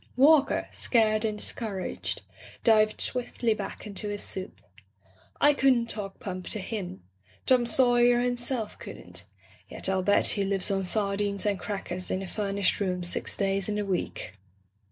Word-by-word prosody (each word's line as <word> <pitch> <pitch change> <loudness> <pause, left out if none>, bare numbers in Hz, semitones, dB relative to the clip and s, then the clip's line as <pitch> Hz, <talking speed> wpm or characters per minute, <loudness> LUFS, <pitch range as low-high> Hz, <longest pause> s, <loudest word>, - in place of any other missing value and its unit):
Walker, 285 +2 +5
scared' 220 -2 +2
and 215 -1 -1
discouraged, 205 -4 -3 0.4
dived 215 -2 +4
swiftly 245 -2 0
back - - -6
into 210 0 -4
his 205 0 -3
soup. 190 0 -6 0.8
I 295 +1 +6
couldn't 255 -4 +3
talk 195 -3 -6
pump 185 -2 -6
to 215 - -2
him. 185 - -5 0.4
Tota 250 -2 +4
Saw 245 +1 +4
yer 240 0 +5
himself 245 -2 -1
couldn't. - - -7 0.4
Yet - - -9
Til 190 0 +1
bet 205 +2 +3
he 200 - +1
lives 195 0 +1
on 195 -1 0
sardines 200 0 0
and 200 -2 +1
crackers 185 -3 -3
in 190 - -1
a - - -6
furnished 200 -1 -1
room 180 -3 -1
six 175 - 0
days 195 0 0
in 210 - -1
the 210 0 -1
week." 180 - -3
210 Hz, 155 wpm, -28 LUFS, 195-235 Hz, 0.8 s, I